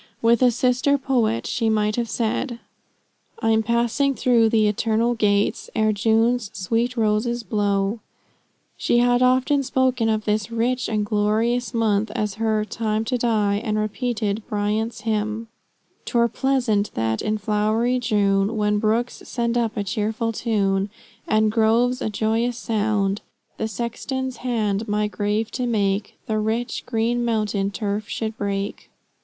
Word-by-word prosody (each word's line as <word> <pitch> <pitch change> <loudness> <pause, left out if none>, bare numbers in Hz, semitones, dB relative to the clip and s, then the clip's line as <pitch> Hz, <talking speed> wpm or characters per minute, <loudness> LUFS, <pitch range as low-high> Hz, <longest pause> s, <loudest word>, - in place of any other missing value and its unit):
With 230 +1 +3
a 250 - +6
sister 250 +4 +2
poet 240 -5 0
she 225 -2 0
might 215 -1 +1
have 235 -2 -2
said 235 +3 -1 0.8
"I'm 225 0 +2
passing 235 +5 +1
through 235 -3 +3
the 220 -2 +3
eternal 225 +3 +1
gates, 205 -3 +1
Ere 215 0 +2
June's 225 +1 +2
sweet 230 +6 -1
roses 225 +2 +1
blow." 205 0 0 0.8
She - - +1
had 245 0 +3
often 255 +3 +3
spoken 255 -3 +1
of 215 -1 0
this 210 0 0
rich 235 +2 -1
and 215 -2 0
glorious 220 +4 +1
month 220 -2 +1
as 210 -1 -1
her 215 -1 +1
"time 220 0 -2
to 250 +2 0
die," 210 -3 +1
and 215 -2 -1
repeated 215 0 -1
Bryant's 215 +2 -1
hymn, 215 +1 -2 0.6
"'Twere 235 -1 +2
pleasant 240 -6 +1
that 110 0 0
in 215 0 -1
flowery 215 +4 +1
June, 205 -2 +1
When 210 0 +1
brooks 225 +3 0
send 235 -1 -1
up 230 -2 0
a 205 - 0
cheerful 220 +3 -1
tune, 200 -3 0 0.4
And 215 0 +3
groves 235 +3 +2
a - - -1
joyous 225 +3 0
sound, 210 -3 0 0.4
The 220 - -1
sexton's 245 +4 -4
hand 220 -4 -1
my 210 0 0
grave 210 +2 -1
to 250 -1 -2
make, 200 -3 0
The 215 -1 -1
rich, 225 +2 -2
green 235 +1 0
mountain 210 -4 0
turf 205 +1 -3
should 220 -1 -3
break." 200 -1 -3
220 Hz, 145 wpm, -23 LUFS, 210-235 Hz, 0.8 s, a